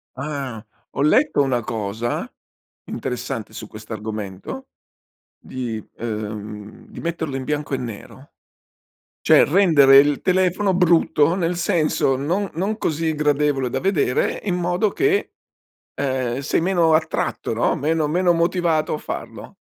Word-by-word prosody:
Ah, 135 -5 -5 0.3
ho - - -3
letto 205 - +3
una 130 -3 +1
cosa 110 +2 -3 0.5
interessante 125 -3 -5
su 110 - -8
questo 110 +1 -9
argomento, 110 - -6 0.7
di 115 -4 -5
ehm, 105 - -6
di 210 - -10
metterlo 160 -5 -3
in 130 - -4
bianco 150 -1 -2
e - - +1
nero, 125 +3 -9 0.9
cioè - - +6
rendere 150 -6 +6
il 145 0 +4
telefono 185 +1 +2
brutto, 170 -2 +3
nel 175 -1 -1
senso 155 -5 +1
non 180 +9 -1
non 195 +7 -2
così 160 -4 -1
gradevole 145 -3 +1
da - - -2
vedere 170 -9 +1
in 185 -4 -1
modo 180 +4 0
che, 400 - +1 0.6
ehm, 130 -3 -1
sei 145 - 0
meno 170 -3 +3
attratto, 160 0 -1
no, - - +1
meno 155 +1 0
meno 175 +2 +2
motivato 170 -2 +1
a - - -1
farlo. - - -7
150 Hz, 130 wpm, -21 LUFS, 125-175 Hz, 0.9 s, cioè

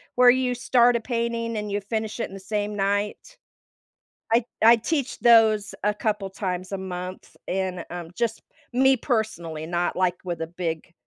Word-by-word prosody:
where 250 0 +7
you 255 0 +3
start 245 0 +4
a 235 - +2
painting 230 -1 -2
and 210 -1 -4
you 205 - 0
finish 220 +2 -3
it - - -1
in - - -14
the 195 - -7
same 205 +2 -3
night. 205 - -2 1.0
I 230 0 +4 0.2
I 230 +1 +8
teach 275 +3 -2
those 220 -3 +5
a 210 +1 +2
couple 210 -2 -2
times 185 -1 -4
a 195 - -2
month, 185 -1 -7
and, 185 -2 -2
um, 175 -1 -7
just 230 -2 -1 0.3
me 265 +1 +4
personally, 175 - -2
not, 175 +1 -1
like, 180 -1 +1
with 175 -2 -4
a 165 - -2
big, 165 -1 -4
210 Hz, 175 wpm, -25 LUFS, 185-235 Hz, 1.0 s, I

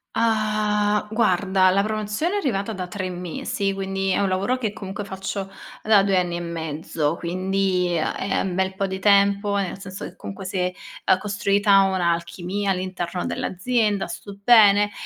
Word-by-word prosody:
Ah, 210 -2 +1
guarda 190 -3 +3
la 195 +2 +3
promozione 215 - -2
è - - +1
arrivata 225 - -1
da 185 -2 -5
3 185 0 -4
mesi, 180 +4 -3
quindi 195 0 -2
è 185 - +2
un 200 - +2
lavoro 195 +7 0
che 220 -5 -3
comunque 200 +1 -6
faccio 195 0 -5 0.3
da 210 -2 +5
2 195 -1 +2
anni 175 -1 0
e 175 - -3
mezzo, 160 -2 -3
quindi, 185 0 0
ehm, 155 - 0
è 195 - -1
un 190 - -2
bel 190 0 0
po' 195 0 -1
di 190 0 -4
tempo. 200 +1 +3
Nel 195 -1 -2
senso 195 -1 -8
che - - -8
comunque, 195 -1 -8
s'è, 185 -1 -1 0.4
ehm, 185 - +5
costruita 200 0 +3
un'alchimia 180 +1 -1
all'interno 185 -1 -3
dell'azienda, 210 +1 0
sto 200 -1 -8
bene. 205 -3 +6
195 Hz, 165 wpm, -23 LUFS, 185-205 Hz, 0.4 s, bene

